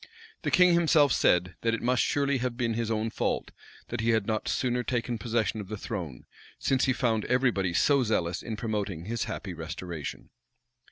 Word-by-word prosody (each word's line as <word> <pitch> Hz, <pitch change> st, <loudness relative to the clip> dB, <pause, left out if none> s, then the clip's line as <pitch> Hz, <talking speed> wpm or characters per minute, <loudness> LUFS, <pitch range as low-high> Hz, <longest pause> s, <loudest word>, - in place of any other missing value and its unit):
The -, -, -1 dB
king 180 Hz, -1 st, +5 dB
himself 160 Hz, -5 st, +4 dB
said, 90 Hz, 0 st, +3 dB
that 115 Hz, 0 st, +1 dB
it -, -, -6 dB
must 125 Hz, -1 st, +2 dB
surely 140 Hz, -2 st, +1 dB
have 125 Hz, -1 st, -2 dB
been 115 Hz, -2 st, 0 dB
his 115 Hz, 0 st, -2 dB
own 110 Hz, 0 st, -1 dB
fault, -, -, -1 dB, 0.4 s
that -, -, -3 dB
he 115 Hz, -, +1 dB
had 110 Hz, -3 st, +2 dB
not 110 Hz, 0 st, -2 dB
sooner 125 Hz, -1 st, 0 dB
taken 120 Hz, -1 st, -2 dB
possession 110 Hz, -1 st, -1 dB
of 100 Hz, -, -9 dB
the 110 Hz, +2 st, -5 dB
throne; 90 Hz, -, -6 dB, 0.3 s
since 135 Hz, -1 st, +1 dB
he 130 Hz, -, +2 dB
found 115 Hz, -4 st, +1 dB
every 125 Hz, 0 st, +3 dB
body 95 Hz, -5 st, -1 dB
so 140 Hz, +7 st, +4 dB
zealous 90 Hz, -6 st, 0 dB
in 110 Hz, -, -5 dB
promoting 105 Hz, -7 st, -3 dB
his 115 Hz, +2 st, -2 dB
happy 95 Hz, -3 st, -5 dB
restoration. 80 Hz, -3 st, -6 dB
115 Hz, 190 wpm, -28 LUFS, 100-125 Hz, 0.4 s, king